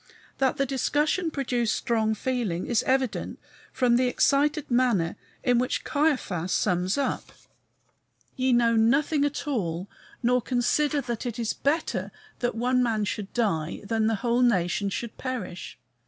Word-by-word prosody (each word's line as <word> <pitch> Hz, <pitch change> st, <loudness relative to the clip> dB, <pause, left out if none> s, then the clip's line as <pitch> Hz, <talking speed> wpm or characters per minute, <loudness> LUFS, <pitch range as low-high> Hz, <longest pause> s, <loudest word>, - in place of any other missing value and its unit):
That 265 Hz, -1 st, +2 dB
the 275 Hz, -, +2 dB
discussion 295 Hz, +6 st, 0 dB
produced 245 Hz, -6 st, 0 dB
strong 220 Hz, -3 st, 0 dB
feeling 220 Hz, -7 st, -2 dB
is 235 Hz, -3 st, +1 dB
evident 260 Hz, -3 st, 0 dB, 0.3 s
from 250 Hz, -2 st, +3 dB
the 255 Hz, 0 st, +2 dB
excited 290 Hz, +3 st, +2 dB
manner 240 Hz, -9 st, +2 dB, 0.3 s
in 245 Hz, -1 st, +3 dB
which 250 Hz, -, -1 dB
Caiaphas 255 Hz, -, 0 dB
sums 185 Hz, +1 st, +1 dB
up: 275 Hz, -2 st, -2 dB, 1.0 s
"Ye 260 Hz, -1 st, +1 dB
know 235 Hz, -1 st, +4 dB
nothing 280 Hz, +7 st, +3 dB
at 290 Hz, 0 st, -3 dB
all, 185 Hz, -, -2 dB, 0.4 s
nor 250 Hz, +1 st, +3 dB
consider 280 Hz, +5 st, +1 dB
that 240 Hz, -1 st, -4 dB
it 235 Hz, -1 st, -4 dB
is 230 Hz, -2 st, -1 dB
better 300 Hz, +4 st, -1 dB, 0.3 s
that 245 Hz, -2 st, -1 dB
one 250 Hz, +2 st, +2 dB
man 225 Hz, -4 st, +1 dB
should 205 Hz, -1 st, -4 dB
die 170 Hz, -10 st, -1 dB
than 220 Hz, +1 st, 0 dB
that 225 Hz, -, +2 dB
the 210 Hz, -, -2 dB
whole 240 Hz, +1 st, +2 dB
nation 200 Hz, -4 st, +2 dB
should 230 Hz, +3 st, -5 dB
perish." 245 Hz, -9 st, -5 dB
245 Hz, 150 wpm, -26 LUFS, 215-265 Hz, 1.0 s, know